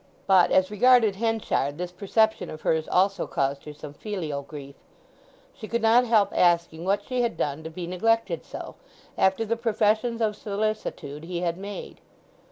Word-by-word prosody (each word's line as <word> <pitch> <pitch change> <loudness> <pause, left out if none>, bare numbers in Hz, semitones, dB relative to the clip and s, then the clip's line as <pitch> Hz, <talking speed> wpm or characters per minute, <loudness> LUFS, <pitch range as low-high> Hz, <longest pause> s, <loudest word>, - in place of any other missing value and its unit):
But, 190 -2 +5
as 185 +1 +3
regarded 225 -2 +4
Henchard, 220 -10 -1
this 180 0 -4
perception 220 +4 +1
of 155 - -8
hers 160 -1 0
also 195 +1 +1
caused 140 0 -2
her 150 - -8
some 145 -1 -9
filial 160 -7 -4
grief; 140 -1 -10 0.8
she 215 - -9
could 235 +1 -2
not 235 +3 +5
help 220 -4 +3
asking 170 -1 +2
what 200 +1 +1
she 255 +1 -2
had 235 -1 -1
done 145 +2 -2
to 160 - -6
be 170 +2 -6
neglected 225 - 0
so, - - -8 0.4
after 190 +4 +2
the 230 +2 0
professions 225 0 +1
of 215 -2 0
solicitude 205 -9 -4
he 175 0 -4
had 170 -1 -1
made. 200 +2 -8
195 Hz, 170 wpm, -25 LUFS, 165-225 Hz, 0.8 s, But